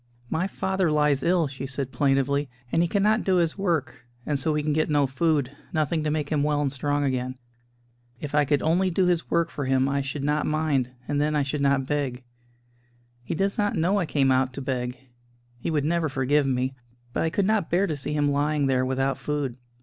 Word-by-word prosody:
"My 180 Hz, +4 st, 0 dB
father 190 Hz, -3 st, 0 dB
lies 150 Hz, -2 st, +2 dB
ill," 175 Hz, -1 st, +2 dB
she 135 Hz, 0 st, -6 dB
said 135 Hz, -1 st, -3 dB
plaintively, 140 Hz, 0 st, +1 dB, 0.2 s
"and 165 Hz, -, +3 dB
he 175 Hz, -, +2 dB
cannot 210 Hz, +4 st, +2 dB
do 190 Hz, -, +2 dB
his 170 Hz, -2 st, +2 dB
work, 155 Hz, -11 st, -2 dB, 0.2 s
and 145 Hz, -2 st, -1 dB
so 155 Hz, +4 st, 0 dB
we 150 Hz, 0 st, 0 dB
can 150 Hz, 0 st, 0 dB
get 155 Hz, +1 st, +1 dB
no 145 Hz, -2 st, +3 dB
food: 140 Hz, 0 st, 0 dB, 0.2 s
nothing 155 Hz, 0 st, 0 dB
to 155 Hz, -, 0 dB
make 150 Hz, -1 st, -1 dB
him 150 Hz, -2 st, +1 dB
well 150 Hz, 0 st, +1 dB
and 145 Hz, -2 st, 0 dB
strong 145 Hz, +2 st, -1 dB
again. 130 Hz, -1 st, -1 dB, 0.8 s
If 145 Hz, -1 st, -6 dB
I 150 Hz, 0 st, +4 dB
could 145 Hz, 0 st, +1 dB
only 175 Hz, +4 st, +2 dB
do 185 Hz, +1 st, +2 dB
his 175 Hz, -2 st, 0 dB
work 170 Hz, 0 st, +1 dB
for 145 Hz, -, -4 dB
him 130 Hz, 0 st, +2 dB
I 140 Hz, 0 st, 0 dB
should 135 Hz, +1 st, -4 dB
not 150 Hz, +1 st, +1 dB
mind; 150 Hz, -5 st, +1 dB, 0.2 s
and 145 Hz, 0 st, 0 dB
then 150 Hz, +1 st, +1 dB
I 145 Hz, -, +2 dB
should 140 Hz, +1 st, -3 dB
not 140 Hz, -1 st, +2 dB
beg. 135 Hz, -3 st, -2 dB, 1.0 s
He 165 Hz, -, -3 dB
does 195 Hz, +4 st, 0 dB
not 205 Hz, 0 st, +1 dB
know 185 Hz, +5 st, +2 dB
I 175 Hz, -, -1 dB
came 135 Hz, -3 st, +2 dB
out 130 Hz, 0 st, +2 dB
to 140 Hz, -, -6 dB
beg 125 Hz, -1 st, -3 dB, 0.6 s
he -, -, -3 dB
would 150 Hz, -3 st, 0 dB
never 165 Hz, 0 st, +1 dB
forgive 135 Hz, +2 st, +1 dB
me; 130 Hz, 0 st, 0 dB, 0.4 s
but -, -, 0 dB
I 165 Hz, -, +1 dB
could 190 Hz, +4 st, 0 dB
not 210 Hz, -4 st, +1 dB
bear 180 Hz, +4 st, +2 dB
to 160 Hz, -, -2 dB
see 145 Hz, +1 st, -4 dB
him 145 Hz, -1 st, +2 dB
lying 145 Hz, 0 st, +1 dB
there 130 Hz, -1 st, +2 dB
without 135 Hz, +1 st, 0 dB
food." 145 Hz, -5 st, -2 dB
145 Hz, 220 wpm, -25 LUFS, 135-160 Hz, 1.0 s, I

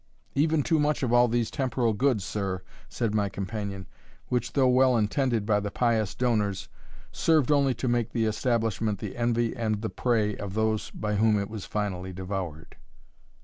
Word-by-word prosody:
"Even 155 Hz, 0 st, +2 dB
too 160 Hz, +1 st, +2 dB
much 150 Hz, -1 st, +1 dB
of 120 Hz, -2 st, +1 dB
all 120 Hz, 0 st, +6 dB
these 120 Hz, -1 st, 0 dB
temporal 125 Hz, -4 st, 0 dB
goods, 120 Hz, -2 st, +1 dB
sir," 95 Hz, -2 st, -3 dB, 0.3 s
said 115 Hz, -4 st, -2 dB
my 105 Hz, -2 st, +1 dB
companion, 100 Hz, -1 st, -5 dB, 0.4 s
"which, 125 Hz, -1 st, -1 dB
though 135 Hz, -2 st, +4 dB
well 130 Hz, 0 st, +4 dB
intended 115 Hz, 0 st, +1 dB
by 105 Hz, -1 st, +2 dB
the 105 Hz, 0 st, -3 dB
pious 110 Hz, -2 st, 0 dB
donors, 105 Hz, -6 st, 0 dB, 0.4 s
served 155 Hz, -3 st, +2 dB
only 140 Hz, -3 st, +3 dB
to 130 Hz, -, -3 dB
make 120 Hz, -2 st, +1 dB
the 115 Hz, -2 st, 0 dB
establishment 110 Hz, -2 st, 0 dB
the -, -, -6 dB
envy 120 Hz, -1 st, 0 dB
and 110 Hz, -3 st, -1 dB
the 110 Hz, -, -2 dB
prey 110 Hz, -4 st, +1 dB
of 100 Hz, -1 st, -6 dB
those 110 Hz, -1 st, 0 dB
by 105 Hz, 0 st, -3 dB
whom 110 Hz, 0 st, +4 dB
it 100 Hz, 0 st, -3 dB
was 110 Hz, -4 st, -6 dB
finally 95 Hz, -3 st, -3 dB
devoured." 90 Hz, -4 st, -6 dB
110 Hz, 175 wpm, -27 LUFS, 105-125 Hz, 0.4 s, all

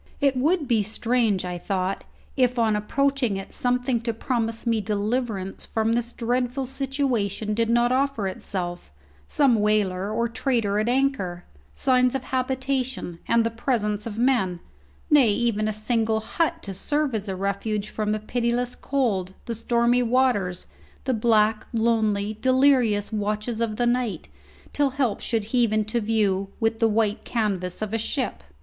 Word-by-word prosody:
It 280 Hz, -2 st, +2 dB
would 300 Hz, +4 st, +1 dB
be 230 Hz, -3 st, +3 dB
strange, 220 Hz, -2 st, 0 dB
I 180 Hz, -1 st, -4 dB
thought, 190 Hz, +1 st, -2 dB, 0.3 s
if 250 Hz, -2 st, +2 dB
on 225 Hz, -2 st, +3 dB
approaching 255 Hz, 0 st, 0 dB
it 195 Hz, -, -8 dB
something 245 Hz, -1 st, 0 dB
to 230 Hz, -1 st, -2 dB
promise 230 Hz, -1 st, -2 dB
me 230 Hz, -2 st, +1 dB
deliverance 210 Hz, -1 st, -2 dB
from 225 Hz, 0 st, 0 dB
this 235 Hz, 0 st, -1 dB
dreadful 245 Hz, +3 st, -1 dB
situation 255 Hz, -6 st, -1 dB
did 230 Hz, +1 st, 0 dB
not 240 Hz, +1 st, +3 dB
offer 265 Hz, -5 st, +1 dB
itself 175 Hz, -, -5 dB, 0.4 s
some 265 Hz, -5 st, +3 dB
whaler 205 Hz, -2 st, +1 dB
or 235 Hz, +2 st, 0 dB
trader 230 Hz, -4 st, 0 dB
at 215 Hz, +2 st, 0 dB
anchor, 245 Hz, -10 st, 0 dB, 0.3 s
signs 250 Hz, -, +2 dB
of 265 Hz, -, -2 dB
habitation 260 Hz, -7 st, -2 dB
and 235 Hz, -, +4 dB
of -, -, +2 dB
the 230 Hz, 0 st, -4 dB
presence 210 Hz, -4 st, 0 dB
of 220 Hz, -1 st, -6 dB
men, 230 Hz, -8 st, +1 dB, 0.5 s
nay, 280 Hz, -6 st, +6 dB
even 215 Hz, 0 st, +1 dB
a -, -, +1 dB
single 220 Hz, +1 st, 0 dB
hut 330 Hz, +8 st, -1 dB
to 195 Hz, -, -5 dB
serve 290 Hz, +7 st, -1 dB
as 210 Hz, -1 st, -2 dB
a 190 Hz, -, -2 dB
refuge 200 Hz, +2 st, -2 dB
from 210 Hz, -1 st, -1 dB
the 215 Hz, -, +1 dB
pitiless 240 Hz, +2 st, -1 dB
cold, 200 Hz, -9 st, -1 dB
the 235 Hz, -, -3 dB
stormy 235 Hz, +2 st, +2 dB
waters, 235 Hz, -7 st, +1 dB, 0.4 s
the 260 Hz, -, 0 dB
black, 220 Hz, -1 st, +2 dB
lonely, 220 Hz, -2 st, +1 dB
delirious 255 Hz, -6 st, +3 dB
watches 215 Hz, +2 st, -2 dB
of 225 Hz, -2 st, 0 dB
the 240 Hz, -, 0 dB
night, 240 Hz, -, -1 dB, 0.4 s
till 285 Hz, -1 st, +2 dB
help 260 Hz, -5 st, -1 dB
should 225 Hz, -3 st, -1 dB
heave 240 Hz, -3 st, +3 dB
into 215 Hz, +2 st, 0 dB
view 205 Hz, -3 st, +1 dB
with 225 Hz, 0 st, 0 dB
the 225 Hz, -, +4 dB
white 215 Hz, 0 st, +1 dB
canvas 200 Hz, -5 st, -2 dB
of 215 Hz, 0 st, -4 dB
a 225 Hz, -, +1 dB
ship. 255 Hz, -, -2 dB
225 Hz, 160 wpm, -24 LUFS, 210-250 Hz, 0.5 s, nay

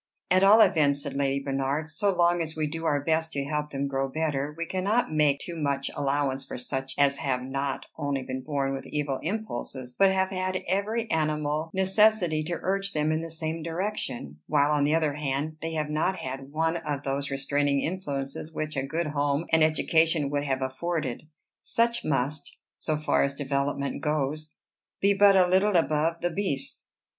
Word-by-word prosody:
"At 185 Hz, +1 st, +5 dB
all 210 Hz, +3 st, +8 dB
events," 145 Hz, -8 st, +4 dB
said -, -, -4 dB
Lady 140 Hz, 0 st, 0 dB
Bernard, 135 Hz, +2 st, -1 dB
"so 200 Hz, +5 st, 0 dB
long 175 Hz, -1 st, +3 dB
as 160 Hz, -1 st, -4 dB
we 155 Hz, -1 st, 0 dB
do 165 Hz, +2 st, -4 dB
our 145 Hz, -2 st, +2 dB
best 160 Hz, +1 st, 0 dB
to 140 Hz, -1 st, -2 dB
help 150 Hz, +1 st, -2 dB
them 140 Hz, -1 st, -3 dB
to -, -, 0 dB
grow 135 Hz, 0 st, -1 dB
better, 150 Hz, -1 st, -1 dB
we 170 Hz, -, -2 dB
cannot 200 Hz, +4 st, 0 dB
make 150 Hz, -2 st, +3 dB
too 175 Hz, -, -6 dB
much 140 Hz, -3 st, -1 dB
allowance 140 Hz, -1 st, 0 dB
for -, -, -7 dB
such 135 Hz, +1 st, -4 dB
as 140 Hz, 0 st, +3 dB
have 130 Hz, -2 st, -1 dB
not 135 Hz, +1 st, -3 dB
only 140 Hz, -2 st, -1 dB
been 130 Hz, +1 st, -4 dB
born 140 Hz, -1 st, -1 dB
with 135 Hz, -, -6 dB
evil 145 Hz, -3 st, -2 dB
impulses, 130 Hz, -, -4 dB
but 195 Hz, -1 st, +6 dB
have 190 Hz, 0 st, +1 dB
had 185 Hz, 0 st, -2 dB
every 210 Hz, +5 st, 0 dB
animal 155 Hz, 0 st, 0 dB
necessity 190 Hz, -3 st, +3 dB
to 170 Hz, +1 st, -2 dB
urge 195 Hz, +1 st, -1 dB
them 150 Hz, 0 st, +1 dB
in 155 Hz, 0 st, 0 dB
the 165 Hz, -, -6 dB
same 160 Hz, 0 st, -4 dB
direction; 165 Hz, -, -4 dB
while, 145 Hz, -1 st, +3 dB
on 145 Hz, -1 st, +3 dB
the 150 Hz, +2 st, +3 dB
other 155 Hz, -3 st, +1 dB
hand, 150 Hz, +1 st, -2 dB
they 165 Hz, 0 st, -3 dB
have 150 Hz, -1 st, -2 dB
not 160 Hz, +5 st, +1 dB
had 135 Hz, -2 st, -6 dB
one 160 Hz, +2 st, +1 dB
of 150 Hz, -4 st, -4 dB
those 140 Hz, +1 st, -2 dB
restraining 140 Hz, +1 st, +1 dB
influences 150 Hz, -4 st, -3 dB
which 155 Hz, -1 st, -4 dB
a 135 Hz, -, 0 dB
good 160 Hz, +5 st, -2 dB
home 145 Hz, +1 st, 0 dB
and 160 Hz, -1 st, +5 dB
education 160 Hz, -1 st, +2 dB
would 145 Hz, 0 st, -1 dB
have 135 Hz, -1 st, -1 dB
afforded. 150 Hz, 0 st, -3 dB, 0.3 s
Such 235 Hz, 0 st, +1 dB
must, 145 Hz, +1 st, -2 dB, 0.2 s
so 155 Hz, -1 st, -2 dB
far 150 Hz, -, +1 dB
as 140 Hz, 0 st, -1 dB
development 140 Hz, 0 st, -2 dB
goes, 150 Hz, 0 st, -2 dB, 0.4 s
be 200 Hz, +1 st, +4 dB
but 200 Hz, 0 st, +6 dB
a 185 Hz, -1 st, +6 dB
little 190 Hz, +3 st, +3 dB
above 165 Hz, 0 st, +2 dB
the 175 Hz, -, 0 dB
beasts." 160 Hz, -7 st, -2 dB
150 Hz, 190 wpm, -27 LUFS, 140-170 Hz, 0.4 s, all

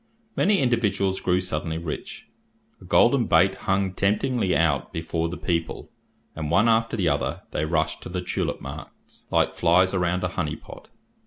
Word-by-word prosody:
Many 200 Hz, +1 st, +3 dB
individuals 100 Hz, -, +1 dB
grew 90 Hz, 0 st, +2 dB
suddenly 80 Hz, -3 st, -2 dB
rich. 80 Hz, -2 st, -6 dB, 0.5 s
A -, -, -13 dB
golden -, -, +4 dB
bait -, -, +4 dB, 0.2 s
hung 95 Hz, -1 st, +1 dB
temptingly 105 Hz, +1 st, +1 dB
out 80 Hz, -5 st, +1 dB
before 80 Hz, 0 st, -2 dB
the 90 Hz, -, -6 dB
people, 85 Hz, -2 st, -3 dB, 0.4 s
and 75 Hz, -1 st, -4 dB
one 100 Hz, +8 st, +4 dB
after 115 Hz, 0 st, +2 dB
the 90 Hz, -5 st, +1 dB
other, 70 Hz, -2 st, -1 dB
they 75 Hz, -, -1 dB
rushed 80 Hz, 0 st, -1 dB
to -, -, -8 dB
the 90 Hz, +1 st, -3 dB
tulip -, -, -3 dB
marts, 70 Hz, +3 st, -11 dB
like -, -, +2 dB
flies 90 Hz, +2 st, +3 dB
around 90 Hz, -1 st, 0 dB
a 90 Hz, -, 0 dB
honey 80 Hz, -4 st, -3 dB
pot. -, -, -13 dB
90 Hz, 165 wpm, -24 LUFS, 80-100 Hz, 0.5 s, golden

